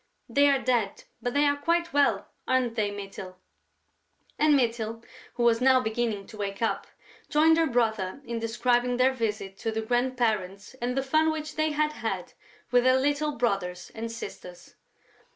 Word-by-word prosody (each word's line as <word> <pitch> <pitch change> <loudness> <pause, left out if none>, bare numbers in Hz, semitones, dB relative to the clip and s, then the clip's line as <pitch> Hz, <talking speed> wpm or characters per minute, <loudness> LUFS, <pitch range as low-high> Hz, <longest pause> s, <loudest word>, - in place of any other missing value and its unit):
They 285 0 +4
are 275 - +4
dead, 240 -6 0 0.2
but 245 +1 -3
they 290 +1 +4
are 285 0 +2
quite 335 +2 0
well, 285 0 +2 0.2
aren't 255 -2 +1
they, 215 -3 0
Mytyl?" 195 -2 -8 1.0
And 300 -1 +5
Mytyl, 230 -3 -1 0.3
who 240 - -1
was 235 0 +3
now 260 0 +6
beginning 220 -4 -2
to 215 - -12
wake 200 -1 -4
up, 225 - -1 0.4
joined 320 +2 +4
her 325 - +3
brother 220 -4 0
in 235 -1 -3
describing 240 +2 +1
their 260 +1 +4
visit 210 -5 -3
to 225 - -2
the 220 0 -2
grandparents 225 -5 -1
and 250 +2 -1
the 270 - +1
fun 310 +4 +2
which 310 -1 -5
they 310 0 +1
had 300 0 +1
had - - -4 0.4
with 245 0 +4
their 255 0 +5
little 290 +2 0
brothers 195 -6 -2
and 230 +1 -5
sisters. 180 -6 -9
240 Hz, 170 wpm, -27 LUFS, 220-275 Hz, 1.0 s, now